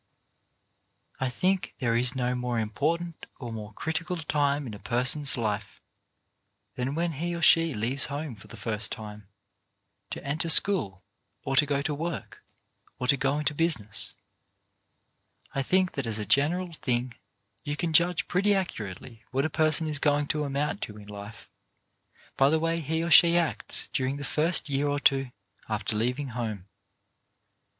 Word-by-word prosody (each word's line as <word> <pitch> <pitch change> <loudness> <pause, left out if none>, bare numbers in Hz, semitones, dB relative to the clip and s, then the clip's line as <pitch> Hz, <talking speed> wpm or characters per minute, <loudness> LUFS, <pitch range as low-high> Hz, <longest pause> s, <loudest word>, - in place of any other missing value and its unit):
I 130 - 0
think 185 +9 -1
there 115 -2 0
is 125 +2 +1
no 125 -1 0
more 125 -1 -2
important 160 +10 -2
or 120 -4 -6
more 105 -1 -7
critical 165 - -3
time 145 -2 0
in 115 - -7
a 105 - -9
person's 130 +5 +3
life 105 -3 -3 0.9
than 130 +3 -3
when 170 +1 0
he 170 +4 -3
or 170 - -5
she 165 -3 +5
leaves 120 +6 +1
home 145 -1 -5
for 105 - -14
the - - -11
first 110 -2 -1
time, 105 -2 -8 0.8
to - - -6
enter 155 +4 -1
school, 135 - +5 0.4
or 135 - -2
to 145 +1 +5
go 140 -1 0
to 150 - -1
work, 165 +1 -5 0.5
or 125 - -3
to 135 - +4
go 140 +1 0
into 150 0 0
business. 145 -11 0 1.4
I 135 - 0
think 185 +6 +2
that 140 -4 -4
as 110 -2 -2
a 105 - -3
general 165 - +1
thing 125 -4 -1 0.5
you 145 -1 -3
can 165 +1 -2
judge 170 +1 +3
pretty 200 +3 +2
accurately 115 - -5
what 135 +3 0
a 155 - -2
person 155 0 +3
is 150 -2 0
going 145 0 +2
to 150 -1 0
amount 145 +7 -2
to 105 - -6
in 105 0 -13
life 105 +2 -10 0.9
by 135 +1 +5
the 160 +1 +2
way 165 +1 0
he 160 +1 -2
or 170 - -3
she 170 +3 +8
acts 170 -3 -1
during 130 +1 -1
the 145 - -6
first 155 +5 +1
year 140 0 0
or 145 0 0
two 135 -2 +2 0.4
after 105 -1 -2
leaving 125 +6 -1
home. 110 -6 -5
140 Hz, 165 wpm, -27 LUFS, 120-160 Hz, 1.4 s, she